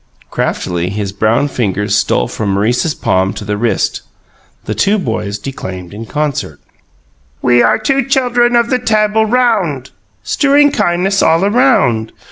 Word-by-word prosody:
Craftily 90 0 -2
his 100 0 -4
brown 110 +7 +1
fingers 105 -7 -2
stole - - +1
from 100 -3 -3
Maurice's 120 +10 0
palm 95 +1 0
to 105 - -7
the 105 0 -2
wrist. 115 +2 -1 0.6
The 105 - -2
two 195 - +1
boys 110 - -3
declaimed 95 -7 -7
in 110 +2 -8
concert: 150 0 -3 0.8
"We 120 -1 +4
are - - +3
two 270 +4 0
chuldrun 245 -3 +2
of 235 +1 +2
the 255 - +2
Tabul 215 -1 +1
Round 205 - 0 0.3
Strewing 290 +1 +3
kindness 190 -1 0
all 165 +3 +3
a 200 - +1
round. 135 - +2
145 Hz, 145 wpm, -14 LUFS, -, 0.8 s, We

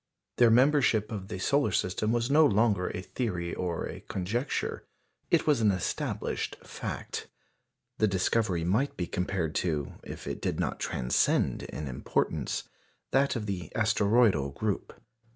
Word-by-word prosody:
Their 120 -1 +6
membership 125 -3 +4
of 100 -3 -5
the 95 - -5
solar 140 +5 +2
system 95 +4 0
was 120 +2 0
no 155 +2 +7
longer 105 -7 +3
a 90 - -5
theory 90 -6 -3
or 85 -2 -2
a - - -6
conjecture 110 +9 -2 0.5
it - - +3
was 145 -6 +3
an 110 - +5
established 95 -3 -2
fact. - - -5 0.7
The 110 - +4
discovery 95 -1 +1
might 110 +12 +1
be 90 - -1
compared 90 -2 -2
to, 75 -5 -2
if - - -8
it - - -4
did - - -1
not - - -1
transcend 60 0 +1
in 75 - -6
importance, 65 - -1 0.5
that 135 +1 +3
of 110 -3 -3
the 90 -6 -4
asteroidal 105 - +3
group. 100 +8 -3
105 Hz, 145 wpm, -29 LUFS, 90-120 Hz, 0.7 s, no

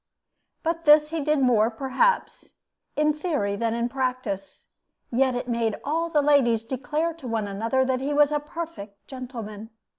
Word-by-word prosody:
But 335 0 -2
this 300 0 +6
he 330 -1 -2
did 300 0 +1
more, 230 -3 +4
perhaps, 270 - 0 0.4
in 300 0 +2
theory 295 - -1
than 230 +2 -1
in 235 0 0
practice; 255 -7 -3 0.5
yet 255 +1 +2
it 245 - -3
made 230 -3 -1
all 330 +3 -1
the 300 -3 +2
ladies 250 -6 +3
declare 285 +7 -2
to 310 -6 -10
one 225 -3 -1
another 230 +7 0
that 260 0 0
he 280 +2 -2
was 295 0 +4
a 295 - +1
perfect 295 -10 -8
gentleman. 230 -5 -7
260 Hz, 160 wpm, -25 LUFS, 230-300 Hz, 0.5 s, this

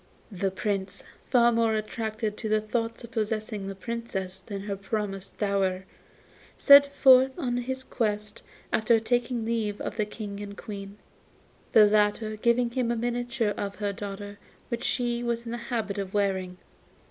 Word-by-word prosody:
The 195 0 -1
Prince, 190 0 -3 0.3
far 240 -2 +5
more 230 -1 +2
attracted 215 0 -3
by 220 - -2
the 215 0 +3
thoughts 230 +2 -3
of 235 - -10
possessing 215 -2 -2
the 195 - -5
Princess 190 -3 -4
than 195 +1 -6
her 200 0 -3
promised 195 -1 -4
dower, 195 -2 0 0.7
set 280 0 +9
forth 265 -1 +6
in 245 -2 -1
his 260 +2 -3
quest 210 -4 -2 0.3
after 225 +1 +4
taking 240 0 0
leave 220 -3 -1
of - - -5
the 215 -2 0
King 205 -2 -6
and 200 -1 -7
Queen, 200 -2 -8 0.8
the 215 - +8
latter 210 +1 +2
giving 235 +2 +2
him 245 -1 0
a 235 - +1
miniature 240 -2 -1
of 200 0 -4
her 205 -1 -2
daughter 205 0 -7 0.3
which 235 -1 -3
she 240 -1 0
was 235 0 -2
in 230 - -5
the 240 - -3
habit 215 -5 -2
of 195 0 -5
wearing. 190 -3 0
215 Hz, 160 wpm, -27 LUFS, 200-235 Hz, 0.8 s, set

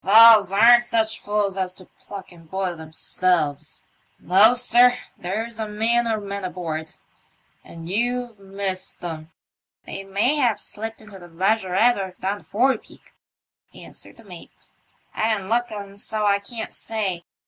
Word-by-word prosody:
"Fowls 215 -1 +7
aren't 235 +4 +7
such 225 -2 0
fools 205 -2 -1
as 185 -1 -1
to 185 - -13
pluck 200 +1 -11
and 165 -2 -17
boil 190 -1 -2
themselves. 160 -1 -2 0.3
No, 205 +6 +5
sir; 245 0 +5 0.2
there's 220 +5 -5
a 220 - -2
man 230 +3 +1
or 220 -1 0
men 200 -1 -6
aboard, 160 -4 -5 0.7
and 165 0 -11
you've 240 +3 -2
missed 195 -2 -4
'em." 160 -2 -6 0.3
" - - -49
They 195 - -5
may 205 +9 +2
have 245 -7 +2
slipped 225 +1 -7
into 205 -2 -12
the 175 - -13
lazaretto 195 +5 +1
or 190 - -7
down 200 +2 -2
the - - -20
forepeak," 245 +2 -2 0.6
answered - - -10
the - - -16
mate. - - -13 0.4
I 220 +1 +1
didn't 195 -2 -7
look, 240 +1 +1
and 200 -2 -8
so 215 -1 -2
I 200 -1 +3
can't 220 +2 -7
say. 200 -6 -3
200 Hz, 155 wpm, -22 LUFS, 185-225 Hz, 0.7 s, Fowls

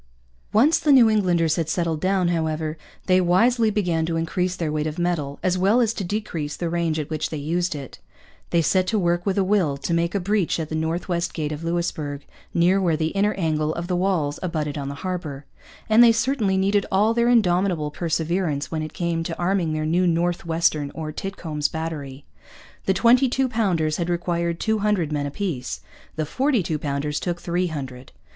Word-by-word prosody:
Once 275 +10 +4
the 300 - +2
New 255 -4 +7
Englanders 175 -6 +2
had 165 -2 -1
settled 165 -2 -1
down, 185 -2 +2
however, 160 -2 -1 0.3
they 185 0 +4
wisely 225 +6 +3
began 180 -6 0
to 165 0 -1
increase 180 +2 -1
their 165 -4 -2
weight 155 0 -1
of 155 +2 -5
metal, 170 -5 -1
as 185 0 +1
well 200 +6 +4
as 230 -2 +2
to 205 - -4
decrease 175 -6 -3
the 170 -2 -2
range 170 -2 0
at 155 0 -4
which 155 0 -2
they 155 - -4
used 165 +3 -1
it. 140 -3 -8 0.5
They 170 -1 +2
set 185 +3 +2
to 220 - +1
work 175 -1 0
with 195 - 0
a 195 - +3
will 185 -8 +1
to 170 - -3
make 170 +1 0
a - - +2
breach 195 -2 0
at 155 -2 -4
the - - -5
North 160 +2 -2
West 175 -1 -2
Gate 155 -2 -2
of 150 +2 -5
Louisbourg, 160 -4 -3 0.3
near 180 +3 +3
where 170 -4 +2
the 160 0 0
inner 200 +3 +1
angle 155 -3 0
of 170 - -4
the 180 0 -1
walls 175 -6 0
abutted 155 -5 -2
on 140 -2 -4
the 140 - -5
harbour; 155 -6 -4 0.4
and 225 +1 +6
they 235 - +7
certainly 225 -5 +1
needed 200 +1 +1
all 210 +4 +3
their 235 +1 +2
indomitable 180 -8 +2
perseverance 160 -1 -1
when 160 -1 -2
it 155 0 -6
came 170 -1 -1
to 165 0 -4
arming 175 -2 0
their 155 0 -1
new 175 +3 +2
'North 170 0 0
Western' 160 -3 +1
or 155 -1 -4
'Titcomb's 160 -4 -3
Battery.' 150 -4 -6 0.6
The 190 - +3
twenty 245 +7 +4
two 265 +1 +1
pounders 185 -10 0
had 170 0 -2
required 170 -1 -1
two 220 -1 0
hundred 200 -7 0
men 145 -1 -1
apiece. 145 -5 -4 0.3
The 155 -2 -1
forty 260 - +1
two 155 -2 -2
pounders 145 0 -2
took 175 -1 -3
three 175 +1 -1
hundred. 135 -5 -7
170 Hz, 205 wpm, -23 LUFS, 155-190 Hz, 0.6 s, New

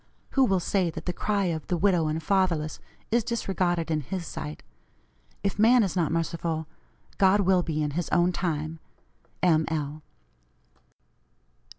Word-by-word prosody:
Who 270 -1 +4
will 195 -5 +2
say 180 0 +1
that 160 0 -7
the 180 - -1
cry 200 0 0
of 160 -2 -6
the 180 - 0
'widow 175 -3 +3
and 155 +1 -2
fatherless' 170 -4 +1 0.3
is 235 0 +3
disregarded 185 -7 -1
in 155 -1 +1
His 175 +5 -5
sight! 75 - -6 0.8
If 200 +1 -1
man 235 +2 +6
is 190 - -2
not 170 -4 +1
merciful, 165 -1 -1 0.5
God 195 +1 +5
will 185 -1 +3
be 155 -3 -2
in 150 - -1
his 170 +3 -2
own 175 +1 +3
time. 160 -2 -2 0.6
M. 160 -3 +4
L." 155 -1 -3
175 Hz, 155 wpm, -27 LUFS, 160-190 Hz, 0.8 s, man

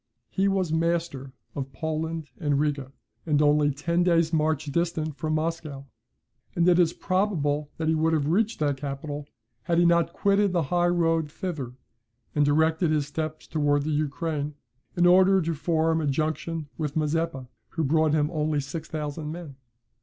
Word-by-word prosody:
He 195 0 +1
was 190 -4 0
master 165 -5 -1 0.2
of 135 -2 -5
Poland 160 +1 -3
and 145 -3 +1
Riga, 140 -3 -1 0.4
and 150 -2 +3
only 150 0 +4
ten 170 +5 0
days' 170 -2 +3
march 155 -1 +1
distant 155 0 -1
from 155 +2 -2
Moscow: 155 -3 -3 0.7
and 170 0 +3
it 180 0 +5
is 170 -2 +4
probable 150 -8 0
that 160 - -2
he 160 - +3
would 160 +1 +2
have 150 -3 +1
reached 215 +7 +1
that 145 -2 +1
capital, 145 +1 -5 0.4
had 170 - +1
he 175 - +5
not 170 -1 +3
quitted 200 +1 +2
the 170 -2 +2
high 175 0 +3
road 165 -3 +1
thither, 155 -10 -5 0.6
and 145 - +3
directed 160 +3 +2
his 150 -2 +1
steps 155 +2 -4
towards 145 -2 +1
the 155 - -1
Ukraine, 150 0 -2 0.4
in 175 - +4
order 190 +2 +6
to 165 -1 -1
form 160 +1 +1
a 150 - -1
junction 155 +2 -2
with 150 -2 -2
Mazeppa, 155 -3 -1 0.2
who 165 - -2
brought 155 +1 +2
him 150 +1 +1
only 155 -2 0
6,000 150 +1 -5
men. 165 -4 -8
155 Hz, 165 wpm, -26 LUFS, 145-170 Hz, 0.7 s, order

